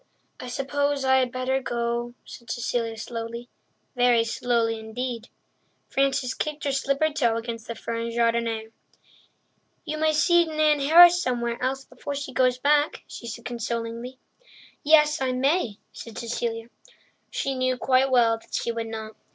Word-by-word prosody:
"I 250 - -7
suppose 280 +2 -1
I 265 0 +5
had 255 -2 +1
better 255 +1 -1
go," 240 0 -2
said 235 -1 -12
Cecilia 230 -2 -2
slowly—very 235 +1 -2
slowly 230 -1 0
indeed. 230 +1 -5 0.6
Frances 270 -2 +1
kicked 305 0 -4
her 280 - 0
slippered 275 +3 0
toe 235 -6 +2
against 230 -1 -6
the 230 - -5
fern 230 0 -4
jardinière. 230 -1 0 1.1
"You 310 -1 -4
may 315 0 +3
see 345 +3 +4
Nan 310 -2 +2
Harris 345 +5 +7
somewhere 235 -5 -2
else 265 +1 -2
before 285 - -7
she 275 -2 -5
goes 255 -1 +2
back," 290 +3 +2
she 235 - -9
said 230 +1 -7
consolingly. 235 +1 -4 0.6
"Yes, 300 0 +4
I 260 -1 0
may," 260 - +1 0.2
said 230 -2 -10
Cecilia. 230 -1 -3 0.6
She 275 - -2
knew 255 -1 0
quite 260 +1 +3
well 230 -3 +3
that - - -9
she 235 - -1
would 230 -1 -4
not. 220 -1 -7
250 Hz, 145 wpm, -25 LUFS, 230-275 Hz, 1.1 s, Harris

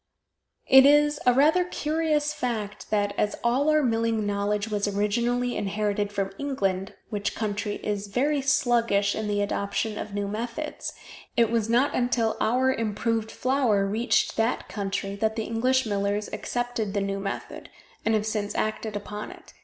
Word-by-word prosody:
It 265 0 +8
is 295 +1 +5
a 250 - +7
rather 310 +7 +5
curious 305 -3 0
fact 220 -7 -4
that, 205 -1 +1
as 210 - +1
all 255 +5 +2
our 305 -1 +4
milling 225 -3 +1
knowledge 205 +1 -1
was 210 -1 -1
originally 235 +5 0
inherited 205 0 -1
from 195 -1 -2
England, 195 -9 -2 0.2
which 205 -1 -2
country 205 -1 -2
is 205 -1 -2
very 280 +8 +1
sluggish 235 -7 +2
in 220 -1 -3
the 205 0 +1
adoption 205 +1 -2
of 205 -1 -6
new 205 0 -1
methods, 230 +8 -4 0.4
it 230 -2 +4
was 225 -2 0
not 245 +5 +3
until 240 -3 +1
our 255 +3 +3
improved 225 0 -1
flour 250 -6 +1
reached 220 +2 +1
that 225 +2 0
country 195 -1 -3
that 220 +1 0
the 225 - -2
English 250 +4 +1
millers 205 0 -1
accepted 245 -4 -2
the 200 - +1
new 195 0 -2
method, 195 0 -6 0.3
and 225 - +2
have 210 -1 0
since 210 -1 -2
acted 215 0 -2
upon 210 +1 -5
it. - - -14
220 Hz, 160 wpm, -26 LUFS, 205-245 Hz, 0.4 s, It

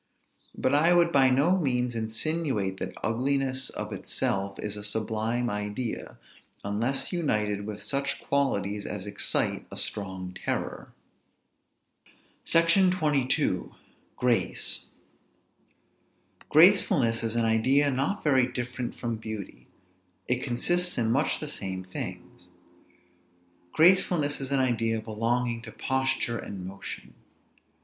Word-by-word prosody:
But 130 - +1
I 165 +4 +5
would 170 -1 +4
by 135 -3 +5
no 150 +9 +3
means 125 -5 0
insinuate 115 - -1
that - - -5
ugliness 130 +2 0
of 105 0 -5
itself 100 0 -2
is 105 -1 -4
a 105 - -6
sublime 110 +3 -1
idea, 105 +3 -4 0.5
unless 115 - -1
united 105 - 0
with 105 -1 -6
such 140 -1 -1
qualities 105 -8 -1
as 100 -2 -5
excite 100 -1 -1
a - - -8
strong 95 -2 -2
terror. - - -3 1.5
SECTION 170 +3 +4
XXII. 150 -7 +1 0.5
GRACE. 120 -7 +1 1.6
Gracefulness 155 - +5
is 115 0 -1
an 115 -1 +2
idea 130 +6 +3
not 135 +10 -1
very 130 -4 +3
different 120 0 -5
from 115 -2 -3
beauty; 110 -3 -8 0.6
it 125 0 0
consists 175 +9 +1
in 115 -2 +1
much 140 +6 +1
the 150 - -5
same 95 -9 -4
things. 95 - -7 1.2
Gracefulness 165 -4 +4
is 135 0 -3
an 135 -1 +2
idea 115 -3 0
belonging 115 +2 -1
to 110 -1 -10
posture 130 0 -1
and 95 -2 -7
motion. 95 +1 -8
120 Hz, 115 wpm, -27 LUFS, 105-140 Hz, 1.6 s, I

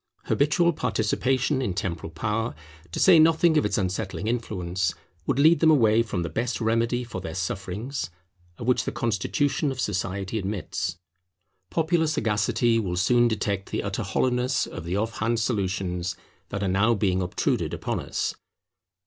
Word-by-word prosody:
Habitual 170 +4 +2
participation 130 +3 0
in 100 -8 -2
temporal 85 -4 -3
power, 105 +4 -2 0.4
to - - -4
say 180 -4 +7
nothing 160 +1 +5
of 150 - +3
its - - 0
unsettling 95 -1 -2
influence, 95 -7 -1 0.3
would - - +1
lead 160 +4 +6
them 160 - +5
away 115 -7 +5
from 105 -6 -2
the - - -2
best 115 +9 -2
remedy 115 +2 +1
for 110 -6 -6
their 80 -3 -6
sufferings 95 - -3 0.5
of 115 - -6
which 125 0 +2
the - - -1
constitution 135 - 0
of 130 - -6
society 95 0 -2
admits. 95 -3 -3 0.7
Popular 165 +2 +1
sagacity 115 -2 +1
will 90 -5 -2
soon 120 +5 +4
detect 100 -3 -2
the - - -2
utter - - -2
hollowness 125 0 +1
of - - -8
the 85 +2 -2
off 110 +2 -2
hand 115 +1 +1
solutions 95 -5 -1 0.3
that 100 - -3
are - - 0
now 100 +5 +3
being 95 -3 +1
obtruded 90 0 -1
upon - - -2
us. - - -2
110 Hz, 155 wpm, -26 LUFS, 95-125 Hz, 0.7 s, say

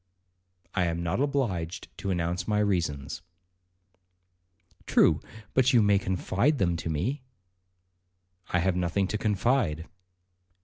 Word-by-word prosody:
'I 90 -3 +1
am 85 0 -2
not 85 +9 0
obliged 105 - -2
to 100 0 -3
announce 90 0 -1
my 105 - +1
reasons.' 85 -9 -1 1.7
'True, - - +4 0.3
but 130 0 +3
you 115 -3 +6
may 100 -1 +4
confide 100 - 0
them 85 -6 +1
to 80 - -4
me.' 125 - -1 1.3
'I 90 - +1
have 95 0 +1
nothing 90 +2 0
to 105 - -2
confide.' 105 - +1
95 Hz, 120 wpm, -28 LUFS, 85-110 Hz, 1.7 s, you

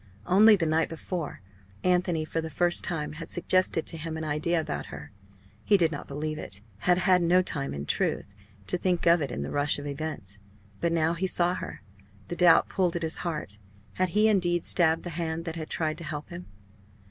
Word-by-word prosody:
Only 210 - +7
the 180 -4 -1
night 160 +1 +1
before, 165 - -5 0.4
Anthony 180 -3 +1
for 165 +1 -2
the 160 - -5
first 175 +4 +2
time 160 -4 -2
had 160 +2 -8
suggested 185 -2 +1
to 165 - -4
him 160 0 -4
an 160 - -4
idea 155 +3 0
about 75 - -4
her. 75 0 -9 0.5
He 205 - +4
did 165 -3 +3
not 145 - -6
believe 155 +2 -4
it 95 - -3 0.2
had 180 +8 +3
had 185 -1 +4
no 180 +2 +4
time 140 -6 -3
in 70 0 -5
truth 100 - -1 0.3
to 180 - -2
think 180 -2 0
of 170 0 +5
it 140 - -2
in 70 - -4
the - - -5
rush 145 0 +2
of 145 - -7
events. 140 -9 -5 0.4
But 170 - 0
now 165 0 +2
he 185 +3 -1
saw 175 -1 +2
her, 180 - -7 0.5
the 175 - -3
doubt 175 -1 +5
pulled 180 -3 0
at 170 - -2
his 160 - -1
heart. 150 - -4 0.3
Had 185 - 0
he 210 +4 +3
indeed 175 -5 +2
stabbed 165 -2 +3
the 175 - -5
hand 165 0 -3
that 165 -1 -4
had 160 -2 -6
tried 155 0 -1
to - - -8
help 150 -1 -5
him? 175 +1 -8
165 Hz, 210 wpm, -27 LUFS, 155-175 Hz, 0.5 s, Only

